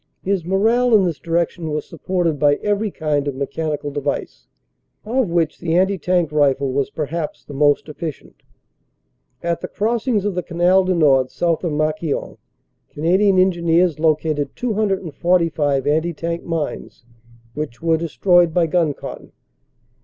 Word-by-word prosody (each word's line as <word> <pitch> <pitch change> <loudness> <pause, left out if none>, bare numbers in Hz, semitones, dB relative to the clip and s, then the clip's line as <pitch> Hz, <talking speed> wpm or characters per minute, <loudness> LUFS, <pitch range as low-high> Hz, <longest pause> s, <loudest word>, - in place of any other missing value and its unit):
His 195 -2 0
morale 225 +7 +3
in 200 -3 +4
this 165 -6 -2
direction 170 +1 -1
was 150 0 -3
supported 175 -5 -2
by 145 0 +4
every 210 +5 -1
kind 150 -5 -1
of 140 - -2
mechanical 145 +2 -3
device, 145 -1 -4 0.6
of 240 -1 0
which 165 -2 0
the 165 -1 -1
anti 190 +1 +2
tank 175 -4 +1
rifle 140 -3 +2
was 140 0 0
perhaps 155 +1 -4
the 145 - -10
most 145 +2 +2
efficient. 155 -1 -8 1.0
At 170 0 -1
the - - -4
crossings 225 -1 -1
of 205 - 0
the 180 - -2
Canal 180 +2 +2
du 185 0 +1
Nord 135 -6 +3
south 170 0 -1
of 170 - -1
Marquion 155 0 -2 0.5
Canadian 185 +6 +2
Engineers 175 -3 +2
located 155 -2 0
245 175 - 0
anti 160 +4 +1
tank 170 +2 -4
mines, 160 -6 -5 0.5
which 150 -2 -6
were 165 -1 +3
destroyed 170 +1 +2
by 175 -2 +4
gun 160 -3 +1
cotton. - - -9
165 Hz, 145 wpm, -20 LUFS, 150-185 Hz, 1.0 s, in